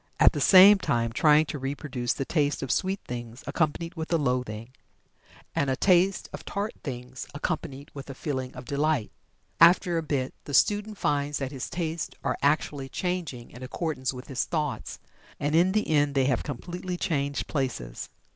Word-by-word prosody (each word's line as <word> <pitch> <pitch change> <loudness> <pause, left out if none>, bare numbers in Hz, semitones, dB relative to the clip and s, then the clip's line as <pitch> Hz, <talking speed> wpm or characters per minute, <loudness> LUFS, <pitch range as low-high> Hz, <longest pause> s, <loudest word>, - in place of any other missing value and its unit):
at - - +7
the - - -2
same 195 +2 +9
time 115 -9 0
trying 150 +4 +5
to 150 -1 -5
reproduce 135 -2 -2
the 135 - -3
taste 145 -2 0
of 135 - -2
sweet 190 +1 0
things 120 0 -7
accompanied 165 +1 -1
with 160 -1 -6
a 165 - +4
loathing, 125 -5 -2 0.8
and 140 - 0
a 130 - +1
taste 185 +4 +3
of - - -7
tart 200 +2 -3
things, 125 -1 -6
accompanied 145 -1 -4
with 140 -1 -9
a 135 - -6
feeling 130 -3 -3
of 125 0 -8
delight. 145 -2 0 0.5
After 170 0 +6
a - - -2
bit 140 -4 -2
the 145 - -2
student 210 0 +2
finds 145 -2 0
that 135 -1 -3
his 135 -3 -5
tastes 165 -2 -3
are - - 0
actually 140 -2 +1
changing 175 -10 -3
in 125 - -12
accordance 130 0 -2
with 125 -1 -9
his 135 -3 -1
thoughts, 150 -4 -3 0.4
and 145 +1 -1
in 175 +3 +4
the 215 +2 +1
end 145 -2 +2
they 135 -1 +3
have 130 -3 +1
completely 175 +6 -5
changed 140 -4 -1
places. 125 - -3
145 Hz, 175 wpm, -27 LUFS, 130-165 Hz, 0.8 s, same